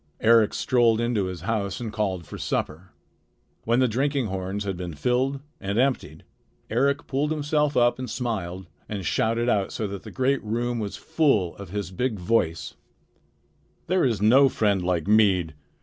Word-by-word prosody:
Eric 115 -1 +4
strolled 120 -3 +3
into 115 -4 0
his 90 -2 -6
house 100 0 -2
and 115 -3 -5
called 95 -5 -2
for - - -9
supper. 85 +5 -3 0.8
When 115 +1 +2
the 130 0 +4
drinking 135 +3 0
horns 95 +2 -3
had 100 -2 -3
been 90 -3 -6
filled 130 - 0 0.2
and 100 +2 -3
emptied, 120 - 0 0.5
Eric 140 +5 +1
pulled 140 +3 -1
himself 150 -1 0
up 120 +1 +3
and 130 - -5
smiled 95 -7 -3 0.2
and 100 -4 -4
shouted 115 +6 0
out 100 -5 +1
so 110 - -3
that 100 -1 -5
the - - -10
great 135 +1 0
room 120 +2 -2
was 105 -2 -4
full 140 - +1
of 100 -3 -9
his 100 0 -4
big 115 +4 -1
voice: 90 -4 0 1.1
"There 185 +1 +1
is 115 -6 +1
no 135 +5 +6
friend 100 -5 +1
like 90 -3 0
mead. 95 -6 +3
110 Hz, 165 wpm, -25 LUFS, 95-125 Hz, 1.1 s, no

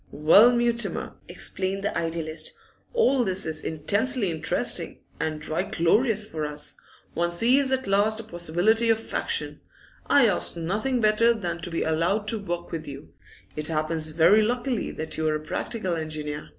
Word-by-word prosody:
'Well, 180 +11 +6
Mutimer,' 235 -1 -1
exclaimed 195 +1 -4
the 205 - -2
idealist, 165 -1 -2 0.4
'all 275 - +3
this 190 -1 -1
is 160 -1 -3
intensely 205 - +1
interesting, 160 -1 0 0.2
and 155 -1 -3
right 170 +5 -2
glorious 210 +6 +2
for 160 -7 -5
us. 150 0 -5 0.4
One 170 +1 0
sees 250 +10 +2
at 260 0 0
last 205 +3 +2
a - - -6
possibility 190 +5 +1
of 225 0 0
action. - - -2 0.5
I 280 -3 +5
ask 190 -4 0
nothing 215 +10 -1
better 225 +2 +4
than 175 -5 -4
to 175 - -4
be 165 - -2
allowed 170 +7 0
to 220 -1 -1
work 175 -2 -5
with 160 -2 -5
you. 140 0 -10 0.4
It 150 0 -1
happens 155 0 -1
very 165 +7 +5
luckily 245 +2 -1
that 155 0 -6
you 160 0 0
are 155 - +1
a - - -2
practical 190 +1 -3
engineer. 155 -2 -5
180 Hz, 165 wpm, -25 LUFS, 160-225 Hz, 0.5 s, Well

